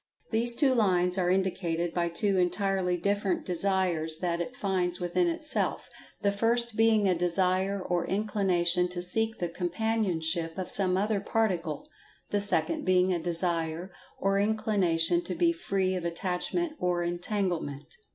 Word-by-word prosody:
These 235 +1 +7
two 270 -1 +3
lines 185 -5 +2
are 180 -1 +1
indicated 175 -3 -1
by 170 -1 0
two 190 +3 0
entirely 185 0 0
different 200 +1 -1
Desires 180 -3 +1
that 170 0 -2
it 250 +8 -6
finds 185 -5 0
within 180 - 0
itself—the 310 -10 -3
first 230 +2 0
being 220 -2 +3
a 185 - +3
Desire 185 +3 0
or 175 -2 -2
Inclination 185 -4 +1
to 180 0 -4
seek 225 +5 -1
the 175 - -2
companionship 175 -3 -2
of 185 -1 -4
some 185 -2 +3
other 205 +1 0
Particle—the 195 -1 -3
second 305 +9 +1
being 185 0 +2
a 175 - -1
Desire 170 +1 -1 0.3
or 195 0 +1
Inclination 185 -6 +1
to 180 - -4
be 170 0 +3
Free 185 +2 -1
of 180 -2 -3
Attachment 185 - -2
or 175 -1 0
Entanglement. 175 - -3
185 Hz, 140 wpm, -28 LUFS, 175-205 Hz, 0.3 s, These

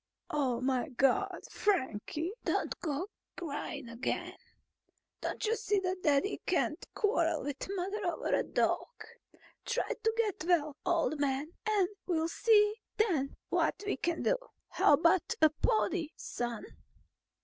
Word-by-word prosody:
"Oh, 260 -5 +1
my 260 +2 0
God, 365 +10 +2
Frankie, 315 - 0
don't - - 0
go 310 +1 -2
to 415 - -23 0.3
crying 285 -2 -4
again! 230 +3 -3 0.9
Don't - - -3
you 445 +2 +2
see 425 -2 0
that 370 0 -2
Daddy 295 +6 +2
can't - - +1
quarrel 335 -6 +2
with 285 +5 -4
Mother 390 +2 -2
over 345 - -1
a - - +4
dog? - - +1 0.8
Try 485 0 -1
to 445 +1 0
get 430 -8 0
well, 310 -4 +2
old 330 -3 +2
man, 285 +2 0 0.2
and 405 -4 +3 0.2
we'll 325 -2 +1
see 420 +2 +4 0.2
then 330 -11 +1
what - - +1
we 405 - 0
can 335 +5 -1
do. - - +3 0.3
How - - +4
about 335 +4 +4
a 315 -1 +6
pony, 375 -2 +1
son?" 240 -2 -4
335 Hz, 140 wpm, -32 LUFS, 285-405 Hz, 0.9 s, a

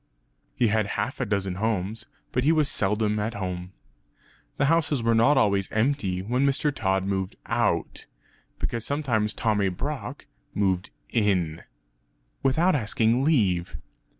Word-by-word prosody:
He 120 - +2
had 110 -1 +1
half 105 +6 -2
a 125 - -1
dozen 95 -3 -1
houses, 110 +1 -2 0.2
but 125 - 0
he 150 - +4
was 155 -3 +3
seldom 105 -2 +1
at 110 +2 -2
home. 90 -2 -4 0.9
The 140 - +2
houses 150 -4 +2
were 115 0 +3
not 115 +6 +4
always 100 -5 +2
empty 110 -6 0
when 125 +6 0
Mr. 140 +1 +2
Tod 95 -5 0
moved 95 -1 -2
out; - - -1 0.5
because 115 -2 -3
sometimes 115 -8 0
Tommy 105 -4 +1
Brock 90 - -5 0.3
moved 95 -2 0 0.2
in; 90 -8 +1 0.8
(without 160 +8 +3
asking 115 0 +1
leave). 100 - +1
110 Hz, 135 wpm, -26 LUFS, 95-130 Hz, 0.9 s, he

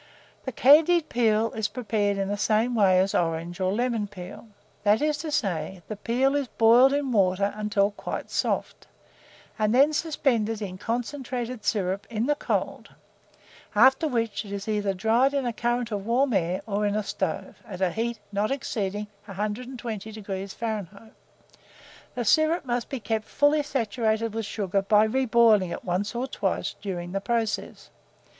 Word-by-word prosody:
The 260 - -3
candied 310 +6 +5
peel 225 -1 +2
is 220 -2 -1
prepared 205 -4 -1
in 195 -1 -1
the 205 - -1
same 220 +4 +1
manner 190 -4 +4
as 195 - -3
orange 170 +1 -1
or 185 0 +1
lemon 230 -1 -1
peel; 195 +2 -10 0.3
that 210 +1 +3
is 300 0 0
to 315 +1 -4
say, 185 - -2
the 215 - -5
peel 250 +6 +1
is 285 -2 0
boiled 235 +4 +5
in 280 -2 0
water 200 -1 +2
until 210 -1 +1
quite 205 - -6
soft, - - -2 0.7
and 215 +2 +2
then 285 +4 +5
suspended 245 -9 0
in 185 -3 -6
concentrated 245 0 -4
syrup 195 -1 -1
(in 225 0 -1
the 295 - +3
cold), 290 - -3 0.9
after 265 +8 +5
which 230 -6 -1
it 200 - -10
is 200 +1 -5
either 205 -2 0
dried 235 +8 +2
in 275 -2 0
a 240 - -1
current 240 0 -1
of 205 -2 -3
warm 255 +2 +2
air, 180 -1 0
or 210 -1 0
in 205 - -1
a 215 - 0
stove, 190 -1 -4
at 185 -4 -7
a 185 -2 +1
heat 230 +3 -2
not 205 +1 0
exceeding 210 -6 -2 0.2
120° 210 -2 -5
Fahrenheit. 220 -1 -5 1.0
The 245 - -2
syrup 310 +8 +3
must 240 -1 -2
be 270 - -4
kept 220 0 -2
fully 290 +1 +2
saturated 230 -4 -1
with 225 -2 -3
sugar 200 -2 -1
by 210 +2 +4
reboiling 225 -6 +3
it - - -6
once 190 +5 -2
or 245 +2 -1
twice 265 - -2
during 175 -3 -5
the 195 +1 -2
process. 225 0 -2
220 Hz, 165 wpm, -26 LUFS, 200-245 Hz, 1.0 s, candied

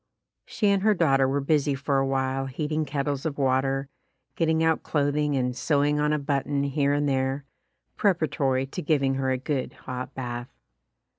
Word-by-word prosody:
She 210 - +1
and 200 -1 +3
her 215 +1 +3
daughter 135 -6 +3
were 140 +2 0
busy 145 0 +1
for 135 0 0
a 135 - +1
while 135 0 -1
heating 155 +3 -2
kettles 140 -1 -2
of 155 -3 -3
water, 135 0 +1 0.5
getting 160 -1 +2
out 160 -1 +2
clothing 145 0 0
and 125 -1 -1
sewing 145 +1 +1
on 150 0 +2
a 150 - +2
button 140 0 -1
here 140 0 +1
and 145 0 +1
there, 135 0 0 0.5
preparatory 145 -8 +1
to 135 - -6
giving 140 -3 +1
her 135 0 -1
a 130 - +1
good 135 0 -3
hot 125 0 -7
bath. 120 -1 -5
140 Hz, 170 wpm, -26 LUFS, 135-150 Hz, 0.5 s, and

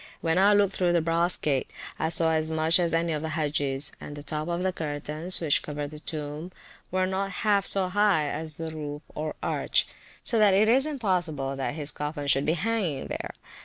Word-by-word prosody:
When 165 +2 +1
I 205 +2 +6
looked 200 -2 +3
through 175 -2 +1
the 170 - +3
brass 170 +2 +1
gate, 140 -3 0 0.3
I 160 - 0
saw 165 -1 +5
as 160 0 0
much 160 +2 +3
as 170 -2 +1
any 165 0 +1
of 150 - -2
the 160 -1 -3
Hagges; 145 -2 0
and 145 - -8
the 145 - -8
top 155 +1 -4
of 175 +1 -2
the 190 -1 0
curtains, 155 +2 -2
which 155 -4 +2
covered 145 -1 -5
the 150 - -9
tomb, 150 +2 -5 0.4
were 185 0 +1
not 190 +1 -2 0.2
half 200 -2 +3
so 195 -2 +4
high 195 -5 +2
as 155 +1 -4
the 165 0 -5
roof 150 -1 -6
or 155 0 -4
arch, - - +1 0.4
so 230 - +2
that 205 -3 +5
it 210 +2 +4
is 265 +6 +4
impossible 175 - -1
his 145 +2 -2
coffin 150 0 -4
should 140 0 +3
be 155 - +3
hanging 185 -6 -1
there. - - -4
160 Hz, 205 wpm, -27 LUFS, 150-185 Hz, 0.4 s, I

